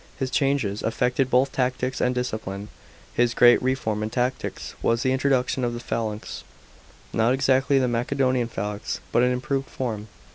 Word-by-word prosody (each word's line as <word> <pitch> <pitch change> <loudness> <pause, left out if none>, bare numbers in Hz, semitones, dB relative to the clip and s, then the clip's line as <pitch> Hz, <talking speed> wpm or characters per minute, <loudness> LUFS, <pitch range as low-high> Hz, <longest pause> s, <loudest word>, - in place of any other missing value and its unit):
His 130 -2 -2
changes 135 -9 +1
affected 125 +3 0
both 130 +2 +3
tactics 125 0 -1
and 125 0 +1
discipline. 110 -5 -4 0.4
His 120 -1 +2
great 120 0 +6
reform 125 -5 -1
in 110 - -2
tactics 125 +2 -2
was 115 0 +1
the 130 - +2
introduction 130 -1 +1
of 120 -1 -1
the - - -5
phalanx, 110 -3 -4 0.7
not 115 +3 +3
exactly 135 +1 +3
the 130 -1 +3
Macedonian 125 +1 +1
phalanx, 105 -1 -4
but 120 - +3
an 125 +1 +3
improved 135 +2 -2
form. 110 -5 -4
125 Hz, 155 wpm, -24 LUFS, 115-130 Hz, 0.7 s, great